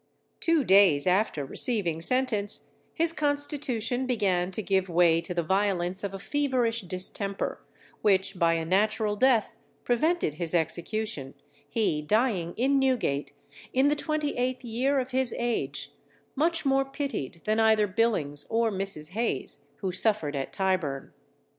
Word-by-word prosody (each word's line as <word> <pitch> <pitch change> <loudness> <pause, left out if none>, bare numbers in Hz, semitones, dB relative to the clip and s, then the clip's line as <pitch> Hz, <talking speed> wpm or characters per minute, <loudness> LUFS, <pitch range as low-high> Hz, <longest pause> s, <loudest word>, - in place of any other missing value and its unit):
Two 330 -4 +2
days 190 - +5
after 185 -6 +1
receiving 170 - 0
sentence, 215 -1 0 0.2
his 330 0 +2
constitution 285 -5 -1
began 190 -7 +1
to 200 +3 -4
give 190 -1 0
way 170 -1 +4
to 175 - -7
the 175 -1 -1
violence 190 0 0
of 200 - -2
a - - -4
feverish 245 -1 0
distemper, 190 +2 -4 0.4
which 195 -2 +2
by 165 -1 +3
a 165 -1 -2
natural 210 +4 +1
death 235 -1 +2 0.3
prevented 310 - +1
his 165 +2 0
execution, 170 -3 -2 0.3
he 205 -10 0
dying 195 -1 0
in 270 +4 +2
Newgate, 250 - 0 0.4
in 265 +3 +4
the 295 - +2
twenty 305 -1 -2
eighth 255 +1 -1
year 255 +4 0
of 260 0 -4
his 260 -1 0
age, 240 -1 -2 0.4
much 325 +3 +1
more 270 0 +3
pitied 270 - -5
than 215 +1 0
either 220 -1 +4
Billings 185 -9 0
or 230 0 +1
Mrs. 190 -5 -3
Hayes 215 - -3 0.2
who 190 - -1
suffered 185 -6 +2
at 135 -1 -3
Tyburn. 185 -8 -2
210 Hz, 140 wpm, -27 LUFS, 180-255 Hz, 0.4 s, days